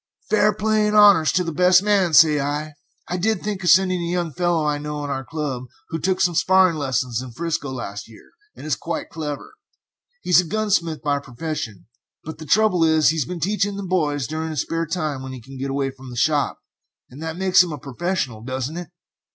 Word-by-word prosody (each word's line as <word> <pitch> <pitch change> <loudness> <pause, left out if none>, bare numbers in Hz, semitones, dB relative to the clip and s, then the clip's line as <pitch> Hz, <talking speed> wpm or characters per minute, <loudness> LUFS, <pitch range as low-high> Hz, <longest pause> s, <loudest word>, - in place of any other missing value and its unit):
"Fair 210 0 +4
play 215 +1 +1
and 210 0 +2
honors 200 -7 +6
to 180 - +1
the 165 - -3
best 180 +3 +4
man, 200 -4 +2
say 150 -1 +6
I! 150 +2 -3 0.3
I 180 - -2
did 215 +1 0
think 205 -2 -3
of 175 - +2
sending 185 -1 +4
a 170 0 -3
young 175 -3 -2
fellow 175 -2 0
I 150 -1 0
know 150 0 -5
in 145 - -4
our 135 -1 -3
club 140 -4 -4 0.2
who 165 - -3
took 185 +3 0
some 175 -2 +2
sparring 185 +1 +4
lessons 130 -4 -1
in 130 - -8
'Frisco 165 -1 -3
last 115 -5 -6
year, 110 - -17 0.2
and - - -11
is 155 - 0
quite 170 - -5
clever; 150 -3 -6 0.7
he's 180 0 +5
a - - -7
gunsmith 175 -4 -1
by 145 -1 +1
profession, 125 - -6 0.4
but 160 - -8
the 155 - -9
trouble 210 -2 +3
is 160 -1 +4
he 160 - 0
has 150 - 0
been 180 -1 -6
teaching 200 +3 0
the 200 - -5
boys 150 -7 0
during 160 +4 -4
his 155 -4 -1
spare 165 0 -3
time 155 -5 -3
when 130 0 -7
he 130 - -8
could 135 +3 -12
get 135 +1 -3
away 135 0 -1
from 130 -1 -13
the 125 - -9
shop, 145 +3 +1 0.5
and 135 +5 -11
that 160 +1 -5
makes 185 -1 +5
him 180 -2 -1
a 150 - -5
professional, 140 -3 -3
doesn't 130 +5 -4
it?" 175 -1 -6
160 Hz, 220 wpm, -22 LUFS, 140-180 Hz, 0.7 s, honors